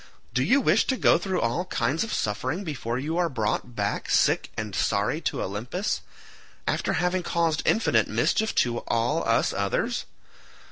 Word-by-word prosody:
Do 130 - +2
you 275 - +4
wish 220 -3 +3
to 260 - +1
go - - +4
through 185 0 -1
all 120 +10 0
kinds 140 - 0
of 225 - -5
suffering 130 - -2
before 130 -8 -3
you 155 +6 -2
are 175 -1 +2
brought 120 -1 -2
back 100 -1 -2
sick - - +3
and 105 -2 -4
sorry 105 +10 0
to - - -2
Olympus, 120 - -3 0.7
after - - 0
having 180 +1 +1
caused 165 -3 0
infinite 225 - +3
mischief 220 0 +1
to 120 -1 +2
all 120 +8 +1
us 115 - +2
others? 100 0 -1
145 Hz, 160 wpm, -26 LUFS, 115-180 Hz, 0.7 s, you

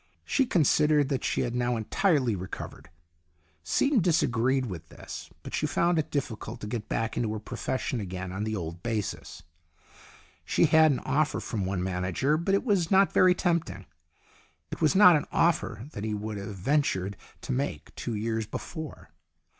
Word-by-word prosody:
She 270 -2 +2
considered 150 - +3
that 135 -3 -1
she - - 0
had 120 - -2
now 120 0 0
entirely 130 - +1
recovered 90 -1 -7 0.7
Seaton 275 - +2
disagreed 130 - +2
with 90 -8 -7
this - - -9
but - - -8
she - - 0
found 170 -1 +2
it 155 0 -2
difficult 120 -4 -4
to - - -5
get 110 -1 -4
back 115 0 -1
into 115 -3 -1
her - - -3
profession 125 +3 -3
again 90 -2 -5
on 95 +3 -3
the 110 0 -2
old 85 -2 -5
basis. 110 -2 -4 1.0
She - - +3
had 160 -1 +6
an 135 - -1
offer 145 +3 0
from 100 -6 -3
one 95 -2 -1
manager, 95 - 0
but 170 +5 +1
it 200 - 0
was 195 -8 +1
not 195 0 +4
very 185 -1 +5
tempting. 160 - -1 0.9
It - - -6
was 155 +1 +3
not 180 -3 +8
an 150 - 0
offer 160 - +1
that 100 - -6
he 110 -1 -1
would 105 0 -4
have 100 +1 -6
ventured 100 -3 0 0.3
to - - -5
make 135 +3 -3
two 120 - -4
years 110 0 -2
before. 160 +6 -7
125 Hz, 170 wpm, -28 LUFS, 105-155 Hz, 1.0 s, not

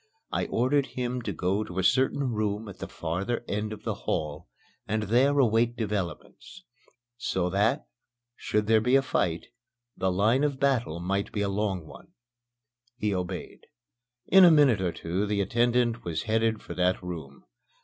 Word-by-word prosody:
I - - -1
ordered 135 +4 +1
him 125 0 -2
to 105 - -3
go 95 +4 -1
to 90 -3 -9
a 95 - +1
certain 130 +4 +2
room 105 0 -2
at 100 - -10
the - - -5
farther 100 +9 -3
end 105 +1 -2
of 110 - -8
the - - -1
hall 75 +1 -3 0.4
and 110 +1 -1
there 130 +7 +3
await 120 -2 +3
developments 105 - -5 0.5
so 90 -7 -1
that, 100 +4 +1 0.5
should 105 0 -1
there 110 0 +4
be 125 +4 +3
a 135 - +4
fight, 85 -9 -1 0.5
the 95 0 0
line 110 +9 +2
of 140 -3 0
battle 125 - +1
might 100 +3 -2
be 105 - -2
a 100 - 0
long 100 -4 -2
one. - - -14 0.8
He 105 -3 0
obeyed. 90 -2 -5 0.6
In 190 0 +7
a 175 - +9
minute 145 - +5
or 90 -2 0
two 90 +5 -2
the 105 0 0
attendant 120 +3 +1
was 85 -2 -3
headed 110 -1 0
for - - -7
that 90 0 0
room. 80 -6 -7
105 Hz, 170 wpm, -27 LUFS, 95-120 Hz, 0.8 s, a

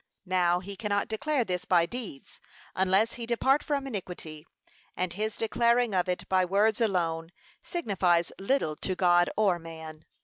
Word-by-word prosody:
Now 180 -1 +2
he 200 +2 -8
cannot 205 -1 -1
declare 275 +4 0
this 180 -2 -2
by 175 -2 +3
deeds, 215 - -8 0.3
unless 190 +4 +2
he 235 -2 -7
depart 265 +4 +2
from 280 -2 -2
iniquity; 180 - -7 0.5
and 180 -1 -1
his 215 +2 -3
declaring 235 0 +2
of 180 0 +1
it 180 - -2
by 185 -1 +3
words 205 +5 +2
alone, 165 -6 0 0.3
signifies 185 - 0
little 195 - 0
to 185 - -2
God 175 -1 +4
or 195 -5 +3
man. 160 -1 -10
190 Hz, 150 wpm, -28 LUFS, 175-225 Hz, 0.5 s, God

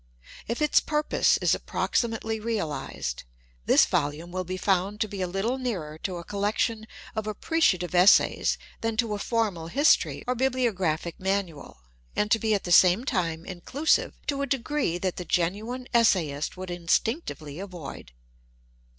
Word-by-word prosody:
If 235 +6 -1
its 300 - +5
pinpose 300 -1 +2
is - - +4
approximately 225 -1 -1
realized, 195 - -3 0.4
this - - +6
volume 150 +4 -2
will 185 +1 -2
be 185 +1 -5
found 195 +2 0
to 215 - +2
be 200 -2 -6
a 185 - 0
little 205 +8 -1
nearer 170 -12 -4
to 185 0 -4
a 170 - -7
col 200 +3 -6
lection 220 +1 0 0.3
of 215 -1 -3
appreciative 210 - +1
essays 180 +3 +5 0.2
than 225 -1 -2
to 225 -2 +1
a 205 - -3
formal 200 -8 -1
histoiy 285 - +3
or 250 - 0
bibliographic 220 -11 -1
manual, 185 - -3 0.3
and 210 +1 0
to 225 - +4
be 220 0 +1
at 200 - -2
the 175 - -4
same 185 +7 +6
time 170 - -1
in 180 -3 -8
clusive 290 - +1
to 280 -1 -1
a 280 - -1
degree 270 - -1
that 185 0 -2
the 180 - -4
genuine 210 +10 -1
essayist 175 -11 +2
would 185 0 -6
instinc 175 - 0
tively 155 +1 -7
avoid. 175 - -9
200 Hz, 160 wpm, -26 LUFS, 175-230 Hz, 0.4 s, this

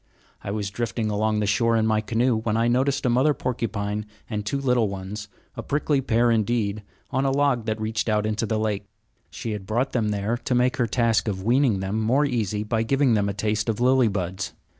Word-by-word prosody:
I - - -5
was 100 -1 -3
drifting 110 0 -2
along 105 +1 +1
the - - +1
shore 115 +3 +2
in 110 - +2
my 110 -1 +2
canoe 115 +3 +1
when 110 0 -1
I 115 +1 +2
noticed 135 +3 +1
a - - +3
mother 135 +5 +3
porcupine 105 -4 -3 0.2
and 105 -2 -3
two 140 +7 -2
little 125 -5 +2
ones, 100 +2 -6 0.3
a - - -4
prickly 145 -1 0
pair 120 -1 +2
indeed, 110 -2 0 0.3
on 130 - +1
a 135 - +2
log 135 -4 +1
that 110 0 -2
reached 110 +1 -2
out 105 -1 +1
into 110 +1 -1
the 110 - 0
lake. 105 -2 -2 0.4
She 115 - -5
had 100 -3 -5
brought 120 +5 0
them 110 -4 0
there 105 +3 -1
to 125 - -2
make 125 +1 +2
her 120 - +1
task 115 0 +1
of 95 -3 -2
weaning 120 -3 +2
them 95 +3 -2
more 130 +7 +3
easy 110 -6 -1
by 110 +1 0
giving 135 +2 +2
them 100 -2 +1
a - - -2
taste 105 +1 -1
of 110 - -1
lily 130 0 +4
buds. 95 -3 -3
110 Hz, 220 wpm, -24 LUFS, 105-125 Hz, 0.4 s, lily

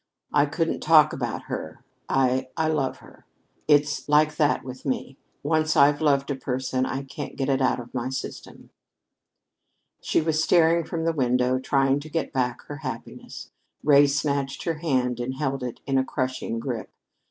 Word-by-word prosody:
I 145 0 +4
couldn't 165 +3 -1
talk 155 -1 +5
about 120 -4 -3
her. - - -6 0.3
I 130 -1 +1
I 160 -1 +1
love 145 -4 -1
her. - - -19 0.4
It's 145 -1 +2
like 150 +1 +4
that 150 -2 +2
with 130 0 -9
me. 135 0 -3 0.2
Once 155 +1 +1
I've 145 +2 +5
loved 140 -2 +2
a - - -1
person, 130 0 -2
I 135 +1 -3
can't 140 +2 -7
get 135 0 -2
it 135 0 +1
out 130 - +2
of 120 0 -10
my 125 0 -2
system." 130 0 -7 1.3
She - - +1
was 155 -1 +1
staring 170 -1 +4
from 160 0 -3
the 165 - +1
window, 125 -2 +1
trying 135 +1 +2
to 150 +2 -10
get 160 -2 -3
back 125 -2 -1
her 145 - -8
happiness. 130 -4 -8 0.3
Ray 145 -1 +6
snatched 140 -1 -1
her 165 -3 -2
hand 130 -6 0
and 125 +2 -3
held 135 -1 -2
it 125 -2 -6
in 135 -1 +1
a - - +2
crushing 130 -4 -3
grip. 115 -1 -4
140 Hz, 175 wpm, -25 LUFS, 130-150 Hz, 1.3 s, Ray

